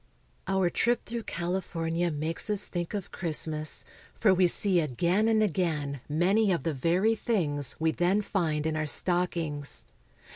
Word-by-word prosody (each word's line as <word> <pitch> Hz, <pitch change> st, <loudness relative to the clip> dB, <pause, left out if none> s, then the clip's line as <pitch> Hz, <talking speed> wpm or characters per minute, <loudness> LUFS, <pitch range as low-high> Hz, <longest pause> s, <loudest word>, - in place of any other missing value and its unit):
Our 190 Hz, -2 st, 0 dB
trip 240 Hz, +6 st, 0 dB
through 235 Hz, -1 st, -6 dB
California 170 Hz, -1 st, -3 dB
makes 155 Hz, +5 st, -1 dB
us 205 Hz, -1 st, +4 dB
think 175 Hz, +2 st, -5 dB
of 200 Hz, -3 st, -6 dB
Christ 165 Hz, -3 st, +1 dB
mas, 155 Hz, -1 st, +1 dB, 0.3 s
for 210 Hz, -4 st, +3 dB
w^e 180 Hz, -1 st, +4 dB
see 190 Hz, 0 st, +5 dB
again 170 Hz, -, 0 dB
and 220 Hz, -1 st, +2 dB
again 155 Hz, -, -2 dB
many 190 Hz, +7 st, +1 dB
of 170 Hz, -7 st, -1 dB
the 165 Hz, -, -2 dB
very 175 Hz, -, +1 dB
things 160 Hz, -, 0 dB
we 160 Hz, 0 st, +1 dB
then 185 Hz, +5 st, 0 dB
find 160 Hz, -7 st, -2 dB
in 160 Hz, 0 st, -1 dB
our 155 Hz, -1 st, -2 dB
stockings. 165 Hz, -4 st, 0 dB
175 Hz, 155 wpm, -27 LUFS, 155-195 Hz, 0.3 s, see